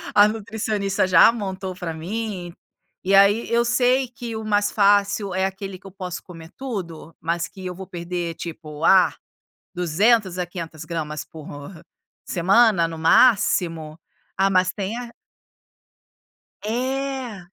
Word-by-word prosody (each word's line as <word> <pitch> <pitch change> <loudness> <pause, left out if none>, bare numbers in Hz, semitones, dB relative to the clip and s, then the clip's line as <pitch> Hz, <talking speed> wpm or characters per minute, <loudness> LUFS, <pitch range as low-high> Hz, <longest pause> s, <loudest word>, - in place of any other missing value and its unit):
a 205 0 +8
nutricionista 215 -3 -1
já 185 +4 +7
montou 190 -4 -5
para 175 -3 -5
mim, 180 +1 -5 0.5
e 195 - 0
aí 205 +4 +4
eu 235 0 +3
sei 255 +2 +2
que 240 -2 -7
o 220 0 -5
mais 205 -1 +1
fácil 200 -1 +2
é 190 +1 +1
aquele 195 -1 -5
que 195 - -13
eu - - -11
posso 180 -2 -6
comer 165 -1 -12
tudo, 180 - -6
mas 170 +1 -2
que 190 -1 -11
eu 180 - -4
vou 190 0 -9
perder 175 -1 -4
tipo, 155 -2 -8
ah, 190 +1 +5 0.6
200 185 +3 +2
a 180 - -1
500 165 -3 -8
gramas 155 -2 -4
por 155 -2 -12 0.8
semana 190 0 +3
no 165 -1 -7
máximo. 165 -5 +3 0.4
Ah 195 +1 +3
mas 185 -1 +2
tem 205 +2 -4
a 245 -1 -7 1.5
É. 260 0 -3
190 Hz, 140 wpm, -22 LUFS, 170-220 Hz, 1.5 s, a